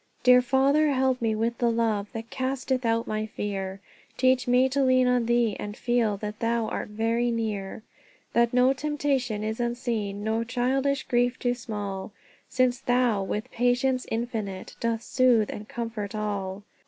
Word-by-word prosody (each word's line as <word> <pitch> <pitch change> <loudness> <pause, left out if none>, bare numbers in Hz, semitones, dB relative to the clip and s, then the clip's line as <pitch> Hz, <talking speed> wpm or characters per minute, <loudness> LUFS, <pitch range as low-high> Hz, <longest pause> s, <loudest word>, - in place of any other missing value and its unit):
"Dear 250 0 +7
Father, 275 +4 +3
help 260 -1 +1
me 225 -1 +1
with 230 +2 -1
the 240 - +3
love 225 -3 0
That 225 0 -7
casteth 260 -1 -1
out 230 0 +1
my 215 0 -2
fear! 195 -2 -4 0.4
Teach 255 0 +3
me 250 +1 +4
to 275 +1 0
lean 255 -1 +4
on 250 -2 +2
thee, 235 -3 +2
and 205 +1 -6
feel 235 -4 +1
That 210 +1 -6
thou 230 -1 0
art - - -3
very 230 +3 0
near; 215 -3 -3 0.5
That 235 0 +3
no 250 +2 +4
temptation 275 -6 -1
is 220 +1 -3
unseen, 230 -4 -2
No 220 +1 0
childish 260 +3 0
grief 245 +1 +1
too 245 -1 0
small, 205 -5 -5 0.4
Since 255 -1 +2
Thou, 245 -5 +2
with 210 +2 -4
patience 245 +2 +1
infinite, 220 -5 -4
Doth 230 -1 -1
soothe 245 -5 +3
and 210 - -8
comfort 225 -3 -4
all. 205 -2 -3
235 Hz, 160 wpm, -26 LUFS, 215-250 Hz, 0.5 s, Dear